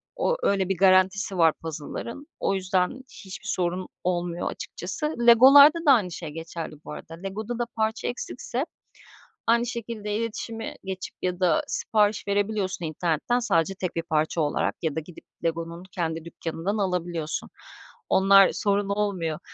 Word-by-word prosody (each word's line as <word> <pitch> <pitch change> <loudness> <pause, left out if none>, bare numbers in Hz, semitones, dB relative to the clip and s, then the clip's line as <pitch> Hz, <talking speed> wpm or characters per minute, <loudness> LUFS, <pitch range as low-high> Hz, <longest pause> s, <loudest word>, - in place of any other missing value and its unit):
O, - - +1
öyle 195 -2 +2
bir 190 - 0
garantisi 190 +1 +3
var 165 -2 +5
puzzle'ların. 165 - -6
O 195 - +1
yüzden 185 +6 0 0.2
hiçbir 190 +2 -9
sorun 180 -1 -1 0.2
olmuyor 175 -1 -1
açıkçası. 305 0 -5
Lego'larda 280 +7 +9
da 285 - +7
aynı 205 -9 +3
şey 165 -2 -6
geçerli 165 0 -6
bu - - -7
arada. 165 - -9
Lego'da 215 +5 -4
da 240 - +1
parça 220 0 -1
eksikse, 245 +2 -4 0.8
aynı 235 +1 +4
şekilde 225 -3 -4
iletişime 225 0 -4
geçip 190 -1 -6
ya 180 0 -2
da 175 -4 +3
sipariş 210 -1 +1
verebiliyorsun 200 -3 -1
internetten, 165 +9 0
sadece 190 -5 +1
tek 185 -2 -4
1 165 - -1
parça 160 0 0
olarak 145 -1 0
ya 160 -4 -1
da - - 0
gidip 160 +2 -12 0.2
Lego'nun 170 +1 -3
kendi 165 -2 -3
dükkânından 170 +5 -4
alabiliyorsun. 175 -5 -2 0.6
Onlar 195 0 +6
sorun 200 -1 0
olmuyor. 195 -6 -1
190 Hz, 145 wpm, -26 LUFS, 170-220 Hz, 0.8 s, Lego'larda